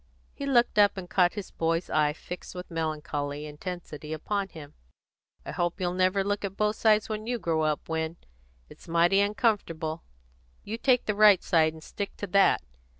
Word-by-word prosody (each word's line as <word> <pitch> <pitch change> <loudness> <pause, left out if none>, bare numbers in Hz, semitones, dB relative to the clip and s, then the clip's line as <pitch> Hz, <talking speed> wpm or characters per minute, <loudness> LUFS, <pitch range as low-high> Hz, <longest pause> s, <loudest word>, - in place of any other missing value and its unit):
He 280 - -5
looked 240 -5 +3
up, 205 -1 +5
and 185 -2 -6
caught 175 -1 +3
his 205 -3 -7
boy's 165 +1 -1
eye 150 -1 +2
fixed 180 +4 -9
with 180 0 -8
melancholy 150 -2 -3
intensity 155 0 -7
upon 195 +5 -2
him. 155 -6 -11 0.7
"I - - -5
hope 175 +2 -2
you'll 180 -1 -1
never 185 +2 +2
look 205 +1 -2
at 195 -1 -4
both 210 0 +1
sides 215 -2 +3
when 215 0 -4
you 245 0 0
grow 165 -7 0
up, 155 -1 -1
Win. 160 +1 -2 0.5
It's - - -16
mighty 170 +3 +3
uncomfortable. 200 -7 0 0.6
You 225 +3 -5
take 250 -1 +3
the 210 - +1
right 205 -2 +6
side, 160 -2 +3
and 160 -1 -12
stick 200 +3 -6
to - - -4
that. 195 - +3
180 Hz, 180 wpm, -28 LUFS, 160-205 Hz, 0.7 s, right